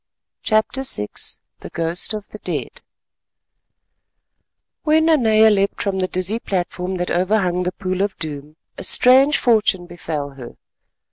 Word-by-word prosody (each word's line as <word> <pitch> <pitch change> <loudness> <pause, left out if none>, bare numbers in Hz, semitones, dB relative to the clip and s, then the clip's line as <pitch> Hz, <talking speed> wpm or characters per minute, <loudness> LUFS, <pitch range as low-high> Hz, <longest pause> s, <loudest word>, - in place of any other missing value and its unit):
CHAPTER 220 +4 +1
VI 105 - 0 0.5
THE - - -9
GHOST 170 +5 -1
OF 210 -1 -8
THE - - -10
DEAD - - -5 2.0
When 315 +1 +3
Nanea 220 -9 +4
leapt 200 -1 0
from 195 -2 -1
the 185 - 0
dizzy 185 +5 -2
platform 185 -2 -3
that 175 0 -3
overhung 180 -1 +1
the 180 0 -1
Pool 185 0 -3
of 200 -1 -2
Doom, 150 -1 -5 0.2
a - - -6
strange 265 +4 +5
fortune 210 -6 +2
befell 160 -5 -5
her. 130 -3 -11
190 Hz, 135 wpm, -20 LUFS, 175-220 Hz, 2.0 s, strange